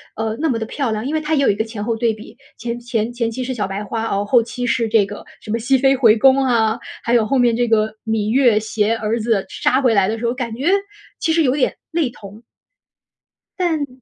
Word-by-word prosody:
呃， 220 0 -2
那 320 - +1
么 235 - 0
地 225 - -3
漂 260 +1 -2
亮。 215 +2 -3
因 290 - -2
为 315 - +1
它 310 +1 -1
也 280 - +2
有 - - +3
一 200 - +2
个 220 - -1
前 220 -2 -6
后 230 0 -1
对 230 -1 +1
比， 215 +1 -13 0.2
前 235 +1 -4
前 235 -1 -2
前 235 -1 -2
期 250 +3 -4
是 260 - -3
小 215 -6 -2
白 195 +2 -4
花 225 +2 -3
哦， 200 -2 -1
后 240 +3 +4
期 245 +2 -5
是 235 -1 +1
这 215 -2 +3
个 205 +1 -9 0.2
什 215 - -7
么 230 - 0
熹 265 +4 +2
妃 270 +1 +3
回 230 -5 +5
宫 265 +4 +5
啊， 225 -3 +1 0.2
还 235 - 0
有 235 -3 +4
后 270 +4 +1
面 240 -2 +3
这 240 0 +1
个 220 -1 +1
芈 220 -1 -1
月 245 -4 +4
携 220 0 0
儿 225 +1 -1
子 220 -3 0
杀 260 +2 +1
回 245 -4 +3
来 195 -2 +3
的 225 - -2
时 230 - -4
候， 235 - +1
感 235 -3 -4
觉 270 +6 -3 0.5
其 320 - +1
实 325 -1 +3
有 255 - +2
点 275 - 0 0.2
类 325 -6 0
同。 210 0 -13 1.2
但 320 -5 0
230 Hz, 275 characters per minute, -19 LUFS, 220-255 Hz, 1.2 s, 回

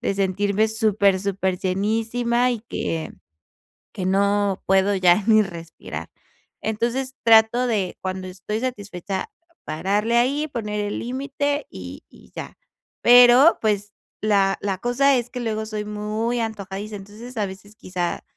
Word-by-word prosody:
de 235 - 0
sentirme 200 +2 +1
super 210 -3 +2
superllenísima, 210 +6 0
y 235 -3 -2
que 160 -1 -3 0.8
que 185 - -4
no 200 0 +1
puedo 195 +1 +3
ya 185 +1 +4
ni 215 -1 +6
respirar. 170 -3 -8 0.5
Entonces, 240 +4 -2
trato 230 +2 +5
de 200 -6 -1
cuando 185 0 -4
estoy 195 +4 -5
satisfecha, 205 - -4 0.3
pararle 205 +9 0
ahí, 280 +5 +1
poner 210 -5 -3
el 205 - -3
límite 280 +3 -2
y 90 -1 -9
y - - -19
ya. - - -7 0.4
Pero, 245 +5 +7
pues, 210 -1 -1 0.3
la 200 -2 +2
la 195 -2 -1
cosa 265 +4 +3
es 240 0 -3
que 250 - -6
luego 220 -1 -2
soy 210 -1 -4
muy 215 +3 -2
antojadiza. 210 -2 -5
Entonces, 215 +5 -10
a 210 - +1
veces 195 +2 -12
quizá, 180 -4 -4
210 Hz, 135 wpm, -23 LUFS, 195-235 Hz, 0.8 s, Pero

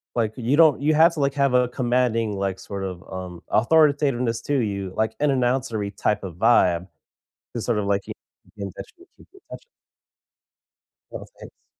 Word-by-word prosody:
like, 110 -2 0
you 130 +4 0
don't 155 -4 +5
you 155 +1 +2
have 165 +2 +5
to, 155 - -6
like, 140 0 0
have 140 -2 +1
a 125 -1 +3
commanding, 120 -4 0
like, 95 -1 -2
sort 100 -1 -6
of, 90 -1 -6
um, 90 -2 -7
authoritativeness 130 -2 +2
to 145 - -2
you, 100 -4 -3
like, 110 0 -1
an 150 0 +2
announcery 120 -6 -1
type 105 -1 -1
of 90 -4 -7
vibe 95 -5 +3 0.7
to 120 - -3
sort 115 0 -1
of, 105 - -1
like, 100 -1 -1
you - - -7 0.4
keep 100 - -8
in 95 - -6
touch - - -10
you 360 - -18
keep - - -18
in 390 - -17
touch - - -9 1.5
Oh, - - -7
thanks. - - -15
115 Hz, 190 wpm, -23 LUFS, 100-140 Hz, 1.5 s, don't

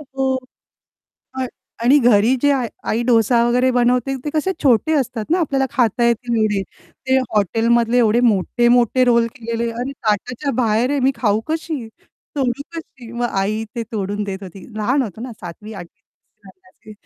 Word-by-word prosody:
हो 265 -1 +1 1.0
अ, 260 -1 -2 0.4
आणि 275 +4 +6
घरी 235 0 +4
जे 285 - +4
आ 270 -2 0 0.3
आई 230 +2 0
डोसा 235 0 +3
वगैरे 250 +2 +3
बनवते 250 +2 +1
ते 295 - -2
कसे 310 +5 +1
छोटे 275 +4 +3
असतात 240 -6 -1
ना, 350 - +3
आपल्याला 270 -4 +1
खाता 240 -1 +1
येतील 235 0 0
एवढे 205 -2 +1 0.5
ते 265 0 +4
हॉटेलमधले 230 +1 +1
एवढे 230 0 +3
मोठे-मोठे 240 +3 +3
रोल 235 -1 +3
केलेले 230 -1 -3
अरे 245 +4 -4
ताटाच्या 245 +4 -2
बाहेर 225 +4 +1
आहे 285 - 0
मी 265 +1 +3
खाऊ 220 -2 +1
कशी? 315 -6 -3 0.5
तोडू 265 0 -1
कशी? 255 -7 -10
मग 240 0 -1
आई 210 +3 -1
ते 230 - -1
तोडून 205 0 -2
देत 195 -1 -6
होती. 190 0 -10
लहान 255 +6 +1
होतो 220 -2 -7
ना 245 -1 -6
7वी 195 +5 -9
8वी 195 +1 -16
235 Hz, 160 wpm, -19 LUFS, 215-260 Hz, 1.0 s, आणि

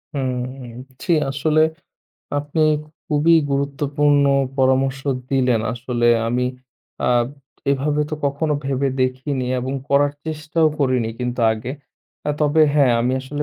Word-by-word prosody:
হুম 130 -2 -4 0.3
ছি। - - -1 0.2
আসলে, 155 +3 +2 0.8
আপনি 145 +2 -3 0.5
খুবই 160 +1 +3 0.2
গুরুত্বপূর্ণ 140 +1 +1 0.3
পরামর্শ 135 +1 +2 0.3
দিলেন। 125 -4 +2
আসলে 120 0 -1 0.2
আমি, 125 +2 0 0.6
আ - - +3 0.6
এভাবে 145 +2 +1
তো, - - -1
কখনো 145 +2 -1
ভেবে 135 0 0
দেখিনি 130 +1 -2
এবং 130 +2 -3 0.2
করার 145 +1 +3
চেষ্টাও 155 +1 +1
করিনি 130 -5 +1
কিন্তু 125 0 -3
আগে। 110 +3 -5 0.6
আ - - +3
তবে 150 +1 +4
হ্যাঁ, 140 -4 +4
আমি 125 +2 +1
আসলে 145 +3 -4
135 Hz, 120 wpm, -21 LUFS, 130-145 Hz, 0.8 s, তবে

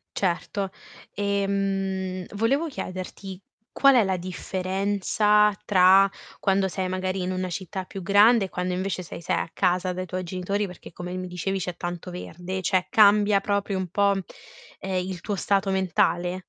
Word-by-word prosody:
Certo. 190 +1 -1 0.4
E, 200 -1 0
mhmm, 195 -2 -2
volevo 270 +10 +1
chiederti: 185 - -7 0.3
qual 275 -1 +5
è 240 - +6
la 190 -1 0
differenza 195 +3 +1
tra 190 0 +6 0.3
quando 195 0 +2
sei 185 0 -3
magari 185 0 -2
in 180 +1 -2
una 185 0 -2
città 185 +2 -5
più 195 +1 -8
grande 205 +3 +5
e - - -8
quando 180 0 -2
invece 185 0 -2
sei 170 - -9
sei 175 0 0
a - - -2
casa 180 0 +1
dai 185 +1 -4
tuoi 185 +1 -4
genitori, 185 +3 -2
perché 180 -2 -12
come 180 +1 -7
mi 185 0 -4
dicevi 180 +2 -3
c'è 180 -1 -4
tanto 175 +1 -5
verde, 180 +1 -6
cioè 185 -1 +1
cambia 205 -1 +5
proprio 200 -1 -1
un 185 -1 -2
po', 200 +3 +2 0.7
ehm, 185 -1 -2
il 185 -2 -6
tuo 205 +1 -2
stato 195 0 +1
mentale? 180 -1 +1
190 Hz, 165 wpm, -25 LUFS, 180-200 Hz, 0.7 s, è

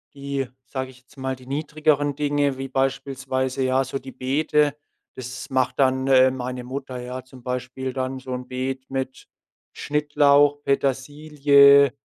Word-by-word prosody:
die, 140 -1 -3 0.2
sage 130 0 -4
ich 130 - -19
jetzt 130 - -24
mal 130 0 -3
die 130 0 -16
niedrigeren 145 0 0
Dinge 145 -2 0
wie 135 0 -4
beispielsweise, 135 0 -1
ja, 130 +1 +2
so 135 +1 -4
die 130 - -10
Beete, 145 +3 +1 0.4
das 125 -1 -7
macht 130 -1 +1
dann, 130 0 +2
äh, 130 -1 +6
meine 125 -1 -5
Mutter, 130 0 -6
ja. 125 +1 -6
Zum 130 -1 -16
Beispiel 125 +1 -4
dann 130 0 -3
so 130 0 -9
'n 125 0 -5
Beet 130 +1 -4
mit 130 -1 -4 0.5
Schnittlauch, 145 -1 +3
Petersilie, 140 0 +4
135 Hz, 150 wpm, -23 LUFS, 130-140 Hz, 0.5 s, äh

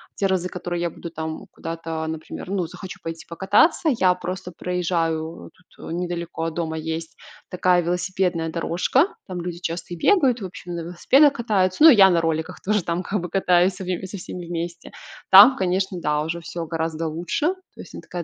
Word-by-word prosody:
те 200 - -1
разы, 185 -1 0
которые 175 -1 -4
я 175 - 0
буду 170 +1 -9
там 160 -1 -6
куда-то, 165 -1 -5
например, 160 +3 -6
ну, 185 -4 -1
захочу 185 +2 -9
пойти 165 0 -7
покататься, 205 - +3
я 185 -1 +4
просто 180 0 -6
проезжаю 165 -2 -2 0.3
тут: - - -7
недалеко 170 -2 -4
от 165 - -4
дома 160 -2 -2
есть 160 +1 -5 0.3
такая 180 -1 +2
велосипедная 180 -1 -1
дорожка, 185 - +1
там 180 -2 -5
люди 175 0 -5
часто 175 +1 -5
и - - -6
бегают, 265 - +3
в 195 - -4
общем, 180 -1 -8
на 170 - -4
велосипедах 260 - +4
катаются. 210 -2 +1
Ну, 325 - +11
и 270 - +8
я 195 -2 +8
на 170 -2 +3
роликах 160 -1 -2
тоже 210 -2 0
там, 170 +1 -2
как 200 0 -2
бы, 175 - -5
катаюсь 180 0 +2
в 185 0 -3
со 200 - -7
всеми 175 -1 -8
вместе. 170 0 -5 0.4
Там, 205 +8 +10
конечно, 185 0 -1
да, 150 -1 0
уже 170 +2 -4
всё 170 0 -5
гораздо 165 0 -3
лучше. 175 - -2 0.3
То - - -21
есть - - -13
она - - -7
такая 175 -1 -6
175 Hz, 190 wpm, -23 LUFS, 165-190 Hz, 0.4 s, Ну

